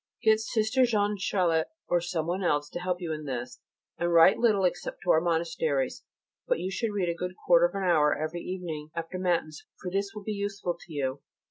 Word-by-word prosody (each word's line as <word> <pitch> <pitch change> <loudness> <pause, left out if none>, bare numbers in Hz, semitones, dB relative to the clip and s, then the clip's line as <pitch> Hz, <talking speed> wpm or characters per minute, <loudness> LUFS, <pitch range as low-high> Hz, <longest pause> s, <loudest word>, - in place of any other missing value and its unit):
Get 220 -1 +5
Sister 220 +3 +1
Jeanne 210 -3 +2
Charlotte 170 -5 +1 0.2
or 175 - +2
someone 175 +2 -2
else 145 -4 +1
to - - -4
help 180 0 -2
you 170 -3 -3
in 155 -1 -6
this, 125 -2 -5 0.4
and 175 0 0
write 170 +2 +6
little 215 -5 +3
except 180 - -2
to 180 - +3
our 160 - +4
monasteries; 160 -5 0 0.5
but - - +1
you 185 +2 -3
should 220 +3 -1
read 200 -4 -1
a - - +1
good 180 +2 -5
quarter 175 0 +6
of - - -13
an 195 - -2
hour 155 -5 +3
every 155 +3 -3
evening 165 -5 -5
after 165 +2 -4
Matins, 170 -4 -1 0.2
for 180 - -5
this 200 +1 0
will 210 - -7
be 215 - -3
useful 200 -3 -3
to - - -14
you. 140 -2 -2
175 Hz, 210 wpm, -28 LUFS, 160-195 Hz, 0.5 s, write